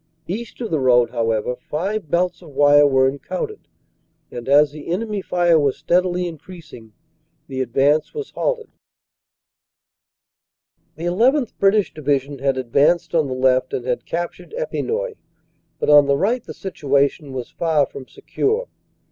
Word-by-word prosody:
East 215 +5 -6
of 230 - -4
the 155 - +1
road, 125 -2 +3
however, 115 +1 -1
five 185 +6 -4
belts 180 +3 0
of 170 - -13
wire 145 0 +6
were 130 -1 +3
encountered, 425 - -5 0.6
and, 120 +1 -7
as 145 +1 +5
the 150 -1 -10
enemy 205 +3 -2
fire 175 -3 +2
was 140 -3 +1
steadily 180 +3 +1
increasing, 160 - -11 0.5
the 130 -1 -4
advance 140 +5 +1
was 440 -2 -6
halted. 475 -3 -2 2.3
"The 160 - -9
llth. 240 - +2
British 200 +1 +3
Division 140 -2 -1
had 135 0 0
advanced 140 +7 +2
on 160 -4 +2
the 130 - -4
left 130 0 +2
and 120 - -4
had 125 -1 -2
captured 175 - -5
Epinoy, - - -3 0.6
but - - -3
on 145 -1 +7
the 140 0 +2
right 230 - 0
the - - -9
situation 140 -5 -1
was 125 -2 -6
far 160 -4 +1
from 135 -1 -11
secure. 445 +4 -2
155 Hz, 145 wpm, -21 LUFS, 135-190 Hz, 2.3 s, on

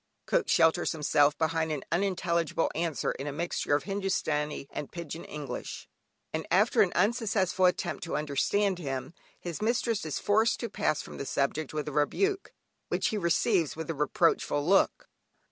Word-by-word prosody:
Cook - - +1
shelters 165 0 +3
himself 150 -1 +3
behind 160 0 0
an 145 -3 -3
unintelligible 170 -3 0
answer 165 -2 -1
in 135 - -6
a - - -2
mixture 155 -1 -1
of 145 - -1
Hindustani 155 -8 -1
and 145 - -6
"Pigeon 170 -1 -6
English," 145 -5 -6 0.5
and 160 0 -3
after 210 +6 +4
an 190 -4 +3
unsuccessful 205 -5 +2
attempt 180 - -1
to 165 - -2
understand 180 +7 +1
him, 135 -2 -4 0.3
his 175 +2 -6
mistress 230 0 0
is 155 -2 -3
forced 220 +3 +2
to 235 - -3
pass 150 - 0
from - - -10
the 140 - -4
subject, 140 +2 -1
with 155 -1 -3
a - - -3
rebuke 385 - 0 0.4
which - - 0
he 215 - -2
receives 170 -1 +2
with 160 +1 -4
a - - -2
reproachful 150 0 +1
look. 195 +3 +3
165 Hz, 160 wpm, -29 LUFS, 150-195 Hz, 0.5 s, after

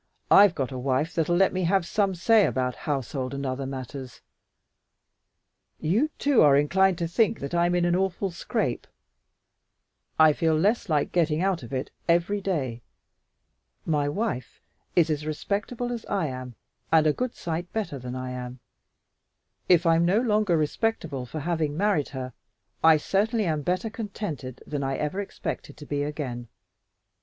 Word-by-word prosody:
I've 200 -3 +7
got 135 -2 -2
a 130 - -5
wife 135 +6 0
that'll 165 +1 +1
let 190 +2 +3
me 185 -1 0
have 190 0 +2
some 195 +1 0
say 215 +4 +4
about 125 -1 -1
household 135 -1 -2
and 140 0 -4
all 130 - 0
other 135 +1 -4
matters. 130 -1 -7 1.6
You, 220 - +1
too, 280 -4 +3
are 140 -2 +6
inclined 185 +5 +3
to 170 - -1
think 220 +6 +1
that 140 - -6
I'm 175 +1 +2
in 175 -1 +2
an 175 0 +2
awful 190 +1 -1
scrape. 170 - -2 1.3
I 155 -1 +7
feel 160 +1 +1
less 205 +5 +1
like 150 -2 +1
getting 165 -1 +1
out 190 -3 +1
of 120 - -10
it 130 0 -3 0.2
every 175 +4 +2
day. 135 -12 -2 1.0
My 145 -3 +1
wife 175 - -3 0.4
is 165 -2 +4
as 150 0 -1
respectable 205 +10 -3
as 235 -2 -4
I 195 -4 0
am 130 -3 -6 0.4
and 160 -1 +5
a 150 - +4
good 250 +5 -3
sight 170 +1 -4
better 205 -11 -3
than 125 0 -6
I 130 0 -4
am. 125 0 -6 1.1
If 175 -1 +5
I'm 165 0 +4
no 185 +5 +3
longer 210 -7 +2
respectable 155 - -1
for 155 +5 -5
having 155 -2 -1
married 200 -7 +1
her, 130 -3 -6 0.5
I 160 -1 +7
certainly 210 +7 0
am 155 -3 0
better 185 +7 -1
contented 185 - -6
than 145 -2 -3
I 135 0 -1
ever 150 +7 -2
expected 170 -6 -6
to 150 - -10
be 145 0 -2
again. 135 -5 -4
160 Hz, 165 wpm, -26 LUFS, 140-195 Hz, 1.6 s, I've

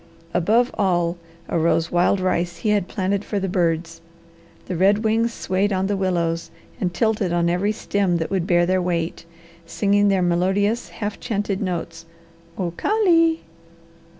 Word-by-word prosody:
Above 220 +8 +2
all 175 -3 +1 0.3
arose 165 0 +1
wild 175 +3 +2
rice 175 -2 -1
he 215 - -2
had 205 -3 +1
planted 195 0 -1
for 205 - -2
the 195 - -2
birds. 165 -2 -1 0.6
The 185 - -4
red 200 +5 +3
wings 225 +1 +1
swayed 195 -1 -1
on 190 0 0
the 200 +1 0
willows 170 -3 -1 0.3
and 180 - -1
tilted 210 -1 0
on 170 0 +1
every 190 +4 +1
stem 200 -4 0
that 165 +2 -3
would 185 -3 -1
bear 175 -1 +3
their 185 +1 +1
weight, 170 -1 -2 0.4
singing 205 +3 +2
their 195 -2 +2
melodious 190 +6 +1
half 205 -2 -5
chanted 205 -3 -2
notes, 165 -3 -4 0.5
"O 180 -3 -2
ka 420 - -1
lee!" 330 -2 +4
185 Hz, 155 wpm, -22 LUFS, 170-205 Hz, 0.6 s, lee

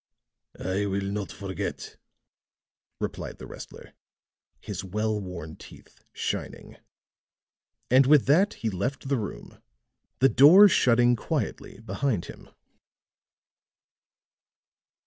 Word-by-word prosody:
"I 100 +2 -2
will 100 0 -2
not 100 -1 -4
forget," 95 -3 -6 1.0
replied - - -5
the - - -10
wrestler, - - -11 0.7
his 100 -2 -6
well 105 +3 -2
worn 85 -5 -8
teeth - - -16
shining. - - -5 1.1
And 130 +1 +5
with 145 -2 +5
that 185 +10 +3
he 110 - -3
left 125 +8 -4
the 135 -3 +1
room, 105 - -8 0.6
the 135 - +5
door 175 +12 +8
shutting 120 -7 +3
quietly 115 - -4
behind 115 -3 -2
him. - - -12
110 Hz, 100 wpm, -26 LUFS, 100-135 Hz, 1.1 s, door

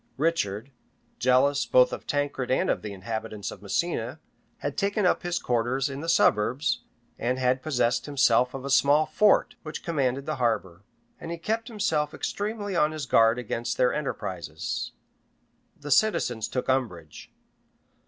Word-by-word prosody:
Richard, 135 -7 -1 0.5
jealous 130 +3 +3
both 125 0 +5
of - - -7
Tancred 145 -3 -1
and 130 - +2
of - - -2
the 105 - -6
inhabitants 110 +1 -5
of - - -11
Messina, 125 - -2 0.4
had 145 -1 -4
taken 200 0 0
up 180 - +3
his 175 0 -1
quarters 125 +3 0
in 135 - -5
the 165 - -4
suburbs, 120 -2 +2 0.4
and 125 +2 0
had 130 0 +1
possessed 125 -5 0
himself 130 -3 +3
of 135 0 -6
a 140 - -3
small 145 +3 +5
fort, 210 +4 +3
which 155 -2 -7
commanded 140 -4 -1
the 155 -1 -3
harbor; 105 -8 -1 0.4
and - - -7
he 170 - -4
kept 225 +7 -2
himself 195 - -1
extremely 205 -1 -3
on 155 -2 +2
his 155 -3 -4
guard 115 -1 +4
against 120 0 -3
their 125 - +3
enterprises. 150 -2 -4 0.9
The 145 0 -7
citizens 125 - +2
took 125 - -3
umbrage. 100 - -2
135 Hz, 155 wpm, -26 LUFS, 120-155 Hz, 0.9 s, both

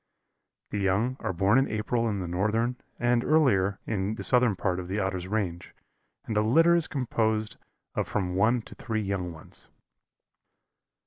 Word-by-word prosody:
The 105 - -2
young 100 +6 +1
are - - -2
born 100 +7 +3
in 135 - +1
April 115 +2 0
in 100 -2 -2
the 90 - -4
northern, 110 +7 0 0.2
and 120 0 +2
earlier 100 -11 +3
in 105 0 -1
the - - -6
southern 125 -4 +3
part 90 -1 -1
of 90 - -6
the 95 +3 -3
Otter's 95 -2 -2
range, 95 -4 -3 0.5
and 110 - -3
a 105 - +4
litter 165 +11 +5
is 170 -2 +2
composed 110 -5 -1 0.4
of - - -1
from 90 -4 -1
one 110 +5 +2
to - - -12
three 110 -2 -3
young 95 -3 -2
ones. 80 -2 -9
105 Hz, 170 wpm, -27 LUFS, 95-120 Hz, 0.5 s, litter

